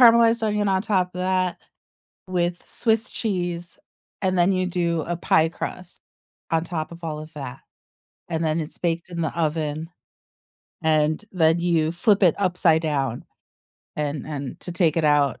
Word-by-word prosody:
caramelized 230 -1 +7
onion 210 -1 +1
on 190 0 +2
top 190 -5 +1
of 180 - -4
that 185 -1 0 0.7
with 175 -1 -1
swiss 225 0 +1
cheese, 175 -5 -2 0.4
and 185 -1 +1
then 175 +2 +4
you 185 -1 +1
do 170 -2 0
a 175 +2 -3
pie 160 -1 +3
crust 180 +1 -6 0.5
on 165 0 +2
top 165 -2 -4
of 170 0 -11
all 155 -2 -3
of 155 +1 -9
that. 135 -3 -7 0.7
And 165 -1 -1
then 160 +1 +1
it's 155 0 -6
baked 170 0 -1
in 170 -1 -4
the 160 - -2
oven, 155 0 -1 0.9
and 155 +3 +2
then 165 -2 +3
you 165 -2 +2
flip 200 +3 +2
it 175 -4 +6
upside 175 -4 +3
down, 135 -6 -1 0.7
and 150 -2 -2
and 140 -3 -5
to 175 - -5
take 170 -3 +2
it 165 - +2
out, 145 -2 +3
170 Hz, 165 wpm, -24 LUFS, 155-185 Hz, 0.9 s, caramelized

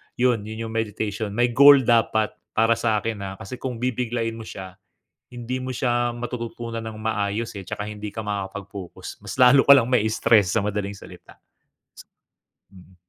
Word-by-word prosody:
'yon 125 -3 +2
'yon 110 +1 -5
'yong 110 - -7
meditation. 110 -1 -2
May 120 +1 +2
goal 140 +2 +8
dapat 110 -2 +2 0.2
para 115 +1 +4
sa'kin, 110 -1 -1
ah, 95 0 -6
kasi 110 +4 -8
kung 130 -2 -4
bibiglain 120 -2 -2
mo 110 - -9
siya, 95 0 -9 0.5
hindi 120 +1 -4
mo 130 - -4
siya 120 -1 0
matututunan 120 -1 -5
ng 110 -1 -7
maayos 110 0 -2
eh. 100 - -6
'Tsaka 105 +3 -5
hindi 105 0 -6
ka - - -7
makakapag-focus 100 -2 -7
mas - - -6
lalo 125 +2 +7
ka 140 - +6
lang 120 -4 +3
mai-stress, 110 -4 +3
sa - - +4
madaling 105 -1 -2
salita. - - -14 1.3
Mm. 95 0 -17
115 Hz, 160 wpm, -23 LUFS, 105-120 Hz, 1.3 s, goal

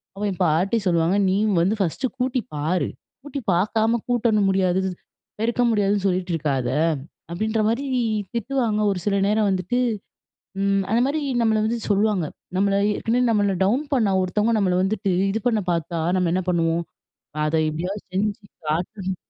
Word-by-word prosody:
அப்ப 200 - -5
என் 190 - -6
பாட்டி 175 +8 +2
சொல்லுவாங்க, 170 +1 +2
"நீ 190 - +2 0.3
வந்து 190 +6 +2
ஃபர்ஸ்ட்டு 195 - 0
கூட்டி 255 0 0
பாரு! 160 +5 0 0.3
கூட்டி 290 -1 -5
பார்க்காம 220 +6 +1
கூட்டணும் 225 -4 +2
முடியாது, 190 -1 +2 0.6
பெருக்க 235 +2 +1
முடியாதுன்னு 205 -2 +1
சொல்லிட்டு 180 -1 -1
இருக்காத!" 140 -5 -1 0.6
அப்பிடின்றமாரி 220 +7 0 0.5
திட்டுவாங்க. 235 -2 0
ஒரு 190 - -2
சில 205 -1 +1
நேரம் 210 0 +2
வந்துட்டு, 190 +5 -1 0.8
ம். 195 0 +2
அந்தமாரி 260 +7 +2 0.2
நம்மள 220 -1 +3
வந்து 230 +2 -1
சொல்லுவாங்க. 205 -3 +2 0.3
நம்மள 195 +1 +2 0.2
ஏற்கனவே 240 +2 0
நம்மள 205 -3 +2
டவுன் 245 +9 +1
பண்ண 220 -7 +2
ஒருத்தவுங்க 210 +5 +1
நம்மள 185 -3 +2
வந்துட்டு 195 0 0 0.2
இது 220 - -1
பண்ண 225 -3 +2
பார்த்தா 170 0 -2 0.2
நம்ம 180 -2 +1
என்ன 185 - +1
பண்ணுவோம்? 165 -1 +1 0.6
அத 155 +1 0
எப்பிடியாவது 180 +7 -3
செஞ்சு 205 +2 -1 0.2
காட்டணும், 185 +4 -2
200 Hz, 145 wpm, -23 LUFS, 180-220 Hz, 0.8 s, நம்மள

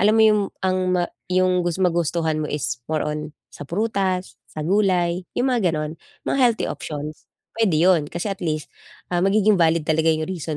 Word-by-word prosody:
alam 215 +2 +4
mo 220 - +6
yung 210 -1 +5 0.2
ang 185 0 +2 0.2
ma 175 - +2 0.2
yung 185 0 +2
gus 175 -1 -1
magustuhan 170 -3 +1
mo 150 - -2
is 125 -5 -3
more 155 -1 0
on 150 0 -4 0.2
sa 145 - -10
prutas, 190 -2 -1
sa 155 -1 -6
gulay, 180 -2 +1
yung 255 +1 +2
mga 215 -7 +2
ganon- 155 0 -3 0.3
mga 275 - 0
healthy 240 -3 +3
options- 150 0 -6 0.3
pwede 195 -8 +3
'yon. 165 -6 +4
Kasi, 185 +4 -3
at 195 - -10
least, 155 -3 -3 0.4
ah, 175 - +2
magiging 200 0 +3
valid 165 -1 +3
talaga 160 +1 +2
yung 155 0 +2
reason 160 -4 -4
175 Hz, 185 wpm, -22 LUFS, 155-195 Hz, 0.4 s, mo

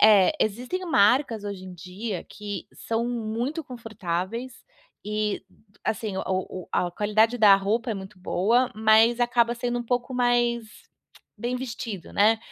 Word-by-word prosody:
Eh, 210 -1 +7
existem 250 - -1
marcas 235 -3 +3
hoje 200 -2 -6
em 185 -1 -9
dia 185 +3 -5
que 205 -3 -6
são 230 +1 -2
muito 240 +7 -3
confortáveis, 225 0 -5 0.4
e 210 0 -1 0.4
assim 215 -3 -2
o - - -1 0.4
o - - -17
a 180 - +1
qualidade 215 +4 +2
da 205 -3 +8
roupa 220 +4 -1
é - - -1
muito 190 0 -9
boa, 235 +8 +2
mas 220 +2 +5
acaba 240 -1 +3
sendo 245 0 -1
um - - -4
pouco 245 +2 -2
mais 240 -1 +2 0.7
bem 245 +1 -2
vestido, 230 -7 -6
né. 215 +2 +4
225 Hz, 145 wpm, -25 LUFS, 205-240 Hz, 0.7 s, da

